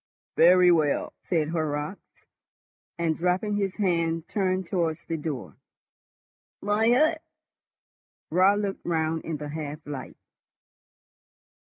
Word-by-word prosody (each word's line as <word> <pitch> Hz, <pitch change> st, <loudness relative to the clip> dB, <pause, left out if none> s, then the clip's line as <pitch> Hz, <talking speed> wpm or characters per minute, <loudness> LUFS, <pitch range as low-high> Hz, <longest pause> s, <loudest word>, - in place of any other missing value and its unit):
"Very 180 Hz, +1 st, +6 dB
well", 155 Hz, -4 st, +1 dB
said 160 Hz, -3 st, 0 dB
Horrocks, 155 Hz, +2 st, -4 dB, 0.7 s
and, 165 Hz, -2 st, 0 dB
dropping 185 Hz, +5 st, 0 dB
his 195 Hz, -2 st, -1 dB
hand, 170 Hz, -4 st, 0 dB
turned 185 Hz, -2 st, 0 dB
towards 170 Hz, -3 st, -2 dB
the 165 Hz, -, -3 dB
door. 150 Hz, -5 st, -5 dB, 1.0 s
"My 210 Hz, +2 st, +1 dB
hat?" 310 Hz, +6 st, +3 dB, 1.1 s
Raut 190 Hz, +4 st, +4 dB
looked 200 Hz, -2 st, -3 dB
round 160 Hz, -1 st, -1 dB
in 160 Hz, -2 st, -3 dB
the 150 Hz, 0 st, -6 dB
half 150 Hz, 0 st, -6 dB
light. 140 Hz, -4 st, -7 dB
170 Hz, 110 wpm, -26 LUFS, 155-195 Hz, 1.1 s, Very